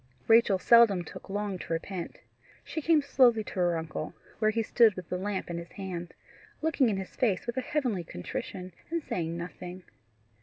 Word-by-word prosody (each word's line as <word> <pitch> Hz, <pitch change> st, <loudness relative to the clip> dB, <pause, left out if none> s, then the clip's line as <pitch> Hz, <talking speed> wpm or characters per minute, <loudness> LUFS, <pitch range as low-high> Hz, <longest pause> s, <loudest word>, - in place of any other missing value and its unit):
Rachel 225 Hz, -3 st, +6 dB
seldom 215 Hz, -3 st, +6 dB
took 170 Hz, -, -11 dB
long 200 Hz, -1 st, -2 dB
to 165 Hz, -, -4 dB
repent. 170 Hz, +1 st, -4 dB, 0.5 s
She 315 Hz, -, -4 dB
came 310 Hz, -1 st, +4 dB
slowly 240 Hz, -5 st, +4 dB
to -, -, -9 dB
her 175 Hz, -3 st, +1 dB
uncle, 160 Hz, 0 st, -5 dB, 0.2 s
where 215 Hz, -, +3 dB
he 225 Hz, +1 st, 0 dB
stood 225 Hz, -2 st, +4 dB
with 185 Hz, -2 st, -8 dB
the 180 Hz, -, -1 dB
lamp 200 Hz, 0 st, -2 dB
in 170 Hz, -1 st, -4 dB
his 170 Hz, 0 st, -10 dB
hand, 180 Hz, -3 st, -6 dB, 0.4 s
looking 305 Hz, -6 st, +2 dB
in 200 Hz, -, 0 dB
his 190 Hz, -1 st, -6 dB
face 210 Hz, -7 st, +1 dB
with 240 Hz, -1 st, -3 dB
a 260 Hz, -, 0 dB
heavenly 250 Hz, -, -1 dB
contrition, 185 Hz, -, -6 dB, 0.2 s
and 335 Hz, -1 st, -2 dB
saying 170 Hz, -6 st, -3 dB
nothing. 180 Hz, +1 st, -7 dB
195 Hz, 185 wpm, -29 LUFS, 175-235 Hz, 0.5 s, Rachel